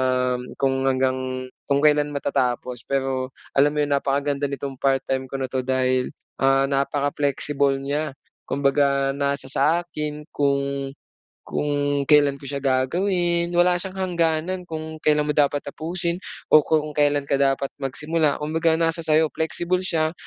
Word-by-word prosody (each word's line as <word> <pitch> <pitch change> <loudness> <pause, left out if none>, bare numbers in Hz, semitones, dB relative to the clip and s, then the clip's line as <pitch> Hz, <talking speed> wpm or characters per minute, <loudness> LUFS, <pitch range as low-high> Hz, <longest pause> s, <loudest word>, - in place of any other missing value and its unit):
um, 125 -1 +1 0.2
kung 135 0 +1
hanggang 130 -1 0 0.2
kung 140 +1 +2
kailan 150 -1 +3
matatapos. 125 -3 -1
Pero 135 -1 -1 0.2
alam 145 +2 +3
mo 150 - +3
'yung 145 - -3
napakaganda 140 0 0
nitong 135 -1 -5
part-time 135 -1 0
ko 135 - -4
na 130 -1 -4
'to 130 - 0
dahil, 130 0 +1 0.3
ah, 135 0 +4
napaka 140 +1 0
flexible 140 -1 0
niya. 140 +1 -3 0.3
Kumbaga, 140 0 +2
nasa 140 -1 -2
sa 160 +5 +2
akin 150 -3 -5
kung 140 -1 0 0.6
kung 145 -1 0
kailan 145 -2 +4
ko 140 - -13
siya 140 0 -4
gagawin. 170 +6 +1
Wala 175 +1 +5
siyang 190 0 -6 0.2
hangganan 170 +2 0
kung 160 0 -6
kailan 150 -1 +3
mo 150 - 0
dapat 145 -1 +1
tapusin 170 +4 -3 0.3
o 155 - +9
kung 155 0 0
kailan 145 -1 +2
ka 140 0 +1
dapat 135 0 +1
magsimula. 150 +2 0
Kumbaga, 160 +2 +1
nasa 165 0 0
sa'yo. 155 -1 +2
Flexible 175 +3 -1
siya, 160 -3 0
140 Hz, 150 wpm, -23 LUFS, 135-155 Hz, 0.6 s, o